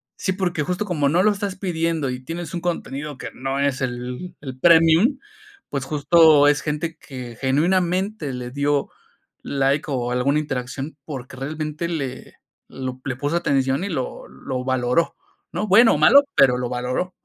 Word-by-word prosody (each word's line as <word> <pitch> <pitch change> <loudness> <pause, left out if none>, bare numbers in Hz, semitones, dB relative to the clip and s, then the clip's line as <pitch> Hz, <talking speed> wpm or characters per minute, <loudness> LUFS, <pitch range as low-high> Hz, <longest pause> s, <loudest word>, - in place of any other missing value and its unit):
sí, 190 - -1
porque 180 -5 -1
justo 180 +7 -2
como 155 -7 0
no 170 +5 +3
lo 210 - +4
estás 200 -2 -3
pidiendo 165 -6 -1
y 125 0 -4
tienes 170 +3 -6
un 170 - -3
contenido 150 -5 -4
que - - -5
no 135 +1 -3
es 140 -2 0
el 125 +6 -4
el 130 -2 -8
premium, 165 - +5 0.5
pues, 140 -2 -3
justo 150 +1 +5
es 145 0 +3
gente 160 +2 -3
que 125 -6 -9
genuinamente 175 +4 0
le 125 -1 -5
dio 140 +2 0 0.5
like 140 +1 0
o 125 -2 -1
alguna 130 +4 +1
interacción, 135 +1 -5
porque 130 -3 -8
realmente 155 +4 -4
le 140 -6 -5 0.3
lo 130 -1 -6
le 130 -3 -2
puso 145 +6 -1
atención 135 -2 +1
y - - -4
lo 130 -8 -4
lo 130 -2 -5
valoró, 130 +5 +1 0.4
¿no?, 210 - -2
bueno 225 +5 +7
o - - +1
malo, 280 +1 +7
pero 125 -2 +5
lo 125 0 -2
valoró, 125 +9 -2
145 Hz, 165 wpm, -22 LUFS, 130-170 Hz, 0.5 s, bueno